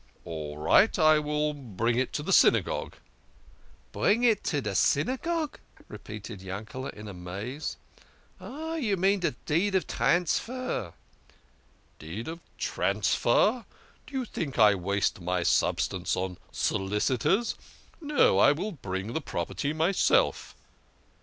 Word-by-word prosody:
" -, -, -34 dB
" -, -, -33 dB
All 75 Hz, -3 st, -6 dB
right! 190 Hz, -, +4 dB
I 155 Hz, -2 st, +5 dB
will 150 Hz, 0 st, -1 dB
bring 115 Hz, -4 st, -2 dB
it 125 Hz, +1 st, 0 dB
to 150 Hz, -, -2 dB
the 195 Hz, -, 0 dB
Synagogue." -, -, +3 dB, 0.5 s
" -, -, -29 dB
Bring 225 Hz, +4 st, +2 dB
it 230 Hz, -3 st, +3 dB
to 145 Hz, -, 0 dB
de 105 Hz, -7 st, -3 dB
Synagogue! 290 Hz, -, 0 dB, 0.2 s
" -, -, -22 dB
repeated 105 Hz, -1 st, -8 dB
Yankele 105 Hz, +8 st, -6 dB
in 105 Hz, 0 st, -9 dB
amaze. 100 Hz, -, -6 dB, 0.3 s
" -, -, -30 dB
Oh, 315 Hz, +5 st, -6 dB
you 220 Hz, -11 st, 0 dB
mean 195 Hz, +2 st, +2 dB
de 175 Hz, -, +1 dB, 0.2 s
deed 185 Hz, +6 st, +1 dB
of 190 Hz, -, +2 dB
transfer." 180 Hz, -, -1 dB, 0.5 s
" -, -, -36 dB
The -, -, -13 dB
deed 105 Hz, +8 st, -6 dB
of 165 Hz, +1 st, -6 dB, 0.2 s
transfer! 120 Hz, -, +1 dB, 0.4 s
Do -, -, -14 dB
you 260 Hz, -2 st, -1 dB
think 150 Hz, -, -5 dB
I 105 Hz, -3 st, +7 dB
waste 100 Hz, 0 st, -1 dB
my 90 Hz, 0 st, -1 dB
sub -, -, +2 dB
stance -, -, -1 dB
on 90 Hz, -1 st, -4 dB
solicitors? 110 Hz, -, 0 dB, 0.5 s
No, 325 Hz, +12 st, +3 dB
I -, -, +6 dB
will 215 Hz, -, -4 dB
bring 100 Hz, -, -5 dB
the 160 Hz, -, -1 dB
property 140 Hz, -, -3 dB
itself." 160 Hz, +5 st, +1 dB
145 Hz, 145 wpm, -28 LUFS, -, 0.5 s, I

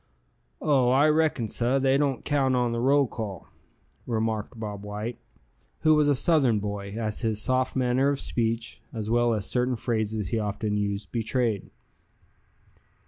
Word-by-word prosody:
"Oh! 135 Hz, -5 st, +3 dB
I 135 Hz, +4 st, +5 dB
reckon, 155 Hz, -7 st, +2 dB
suh, 120 Hz, +5 st, +1 dB
they 135 Hz, 0 st, +3 dB
don't 140 Hz, -2 st, 0 dB
count 135 Hz, -3 st, +2 dB
on 125 Hz, -1 st, +1 dB
the 115 Hz, -, -2 dB
roll 140 Hz, +3 st, +4 dB
call," 105 Hz, -6 st, -6 dB, 0.6 s
remarked 110 Hz, 0 st, -2 dB
Bob 105 Hz, -2 st, -5 dB
White, 105 Hz, +3 st, -5 dB, 0.6 s
who 155 Hz, -1 st, +5 dB
was 150 Hz, -1 st, +4 dB
a 145 Hz, -, +4 dB
Southern 135 Hz, -6 st, +3 dB
boy, 100 Hz, 0 st, -4 dB
as 110 Hz, -2 st, -3 dB
his 110 Hz, -3 st, 0 dB
soft 130 Hz, +3 st, 0 dB
manner 130 Hz, +1 st, +2 dB
of 140 Hz, -1 st, -1 dB
speech, 115 Hz, 0 st, -2 dB
as 110 Hz, -2 st, -4 dB
well 120 Hz, 0 st, +3 dB
as 105 Hz, -2 st, -2 dB
certain 125 Hz, +2 st, 0 dB
phrases 110 Hz, -4 st, -2 dB
he 115 Hz, -, 0 dB
often 105 Hz, 0 st, -2 dB
used, 100 Hz, 0 st, -2 dB
betrayed. 115 Hz, -2 st, -1 dB
115 Hz, 155 wpm, -26 LUFS, 110-130 Hz, 0.6 s, I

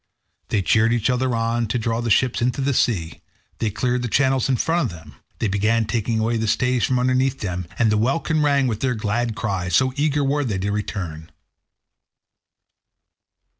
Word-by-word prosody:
They 100 Hz, -, 0 dB
cheered 115 Hz, +4 st, +3 dB
each 120 Hz, +1 st, +1 dB
other 125 Hz, -1 st, 0 dB
on 115 Hz, 0 st, 0 dB
to 115 Hz, -, -1 dB
draw 115 Hz, 0 st, -1 dB
the 120 Hz, -, -2 dB
ships 125 Hz, +3 st, +2 dB
into 125 Hz, +3 st, 0 dB
the 135 Hz, +1 st, +1 dB
sea; 85 Hz, -11 st, 0 dB, 0.4 s
they 110 Hz, -, 0 dB
cleared 125 Hz, +4 st, -1 dB
the 125 Hz, -, -2 dB
channels 130 Hz, +1 st, +1 dB
in 130 Hz, -, +2 dB
front 165 Hz, +2 st, +1 dB
of 85 Hz, -, -9 dB
them; 75 Hz, -2 st, -15 dB, 0.2 s
they -, -, -1 dB
began 110 Hz, +3 st, +1 dB
taking 110 Hz, +1 st, -1 dB
away 115 Hz, +1 st, 0 dB
the 110 Hz, 0 st, -1 dB
stays 125 Hz, +2 st, +1 dB
from 130 Hz, -, 0 dB
underneath 130 Hz, +1 st, +1 dB
them, 90 Hz, -3 st, -3 dB
and 115 Hz, -3 st, +3 dB
the 105 Hz, -, +2 dB
welkin 155 Hz, +6 st, +1 dB
rang 140 Hz, -2 st, +3 dB
with 110 Hz, -4 st, -1 dB
their 130 Hz, -2 st, 0 dB
glad 110 Hz, +2 st, -1 dB
cries, 95 Hz, -4 st, -2 dB
so 130 Hz, 0 st, +3 dB
eager 145 Hz, 0 st, +1 dB
were 145 Hz, +2 st, +1 dB
they 110 Hz, -7 st, -2 dB
to 100 Hz, +2 st, -2 dB
return. 90 Hz, -6 st, -4 dB
115 Hz, 190 wpm, -22 LUFS, 105-130 Hz, 0.4 s, cheered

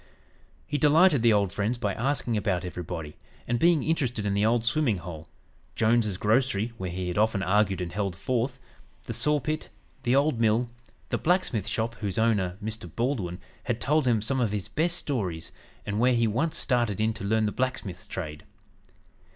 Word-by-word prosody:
He 145 Hz, -1 st, -2 dB
delighted 150 Hz, 0 st, +5 dB
the 115 Hz, 0 st, +5 dB
old 100 Hz, -3 st, +2 dB
friends 105 Hz, +4 st, -1 dB
by 105 Hz, -5 st, -1 dB
asking 120 Hz, +1 st, -1 dB
about 100 Hz, -4 st, 0 dB
everybody, 85 Hz, -3 st, -6 dB, 0.3 s
and 120 Hz, 0 st, 0 dB
being 170 Hz, -3 st, +4 dB
interested 125 Hz, -9 st, 0 dB
in 100 Hz, -, +1 dB
the 100 Hz, +1 st, +1 dB
"old 115 Hz, +1 st, +2 dB
swimming 115 Hz, -2 st, +2 dB
hole," 80 Hz, -2 st, -8 dB, 0.5 s
Jones's 110 Hz, -3 st, +2 dB
grocery 110 Hz, +1 st, +1 dB
where 95 Hz, -1 st, -3 dB
he 90 Hz, +1 st, -4 dB
had 90 Hz, -, -1 dB
often 110 Hz, -3 st, +2 dB
argued 95 Hz, -1 st, +2 dB
and 85 Hz, -1 st, -4 dB
"held 100 Hz, -3 st, -2 dB
forth," 125 Hz, +4 st, -1 dB, 0.4 s
the -, -, -5 dB
saw 150 Hz, 0 st, +2 dB
pit, 155 Hz, +4 st, -3 dB, 0.3 s
the 125 Hz, 0 st, +2 dB
old 140 Hz, -3 st, +2 dB
mill, 115 Hz, +2 st, +2 dB, 0.4 s
the -, -, -1 dB
blacksmith 155 Hz, -, +1 dB
shop, 115 Hz, +1 st, -1 dB
whose 100 Hz, -4 st, -3 dB
owner, 100 Hz, -5 st, +1 dB
Mr. 110 Hz, -4 st, -4 dB
Baldwin, 115 Hz, -8 st, -1 dB, 0.3 s
had 120 Hz, -2 st, -1 dB
told 150 Hz, 0 st, +2 dB
him 115 Hz, -4 st, +2 dB
some 130 Hz, +4 st, 0 dB
of 115 Hz, -5 st, +1 dB
his 100 Hz, -3 st, -2 dB
best 170 Hz, +2 st, 0 dB
stories, 100 Hz, -, -3 dB, 0.3 s
and 100 Hz, +1 st, -2 dB
where 125 Hz, +1 st, +4 dB
he 115 Hz, 0 st, +3 dB
once 135 Hz, +10 st, 0 dB
started 120 Hz, -6 st, +1 dB
in 110 Hz, +1 st, +2 dB
to 100 Hz, -, -8 dB
learn 110 Hz, +2 st, +2 dB
the 105 Hz, -, 0 dB
blacksmith's 105 Hz, -9 st, -3 dB
trade. 75 Hz, -4 st, -6 dB
110 Hz, 185 wpm, -27 LUFS, 100-130 Hz, 0.5 s, delighted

